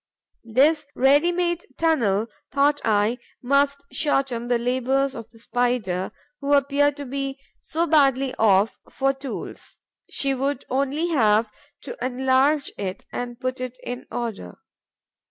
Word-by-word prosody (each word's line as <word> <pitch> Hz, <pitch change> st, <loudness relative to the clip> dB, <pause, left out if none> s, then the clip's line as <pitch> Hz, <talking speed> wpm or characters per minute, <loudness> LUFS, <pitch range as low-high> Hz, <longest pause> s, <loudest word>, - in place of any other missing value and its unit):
This 295 Hz, +2 st, +4 dB
ready 285 Hz, +6 st, +4 dB
made 345 Hz, -1 st, -1 dB
tunnel, 230 Hz, -11 st, +2 dB, 0.3 s
thought 285 Hz, +2 st, +2 dB
I, 215 Hz, +3 st, +2 dB, 0.2 s
must 280 Hz, +2 st, +2 dB
shorten 270 Hz, -5 st, 0 dB
the 245 Hz, -1 st, +2 dB
labours 260 Hz, +3 st, 0 dB
of 230 Hz, -, -8 dB
the 230 Hz, -, -20 dB
Spider, 225 Hz, -6 st, -1 dB, 0.3 s
who 280 Hz, 0 st, 0 dB
appears 285 Hz, +1 st, +3 dB
to 285 Hz, -1 st, -7 dB
be 275 Hz, +1 st, -3 dB, 0.2 s
so 330 Hz, +2 st, -1 dB
badly 275 Hz, -4 st, +3 dB
off 205 Hz, -1 st, +3 dB
for 270 Hz, 0 st, +1 dB
tools; 270 Hz, 0 st, -8 dB, 0.3 s
she 275 Hz, -1 st, 0 dB
would 270 Hz, +1 st, -2 dB
only 280 Hz, +6 st, 0 dB
have 220 Hz, -7 st, +3 dB, 0.3 s
to -, -, -7 dB
enlarge 265 Hz, +3 st, +2 dB
it 190 Hz, -2 st, -4 dB
and 245 Hz, 0 st, -5 dB
put 255 Hz, 0 st, -3 dB
it 255 Hz, 0 st, -5 dB
in 245 Hz, 0 st, -6 dB
order. 220 Hz, -, -5 dB
265 Hz, 135 wpm, -24 LUFS, 240-280 Hz, 0.3 s, This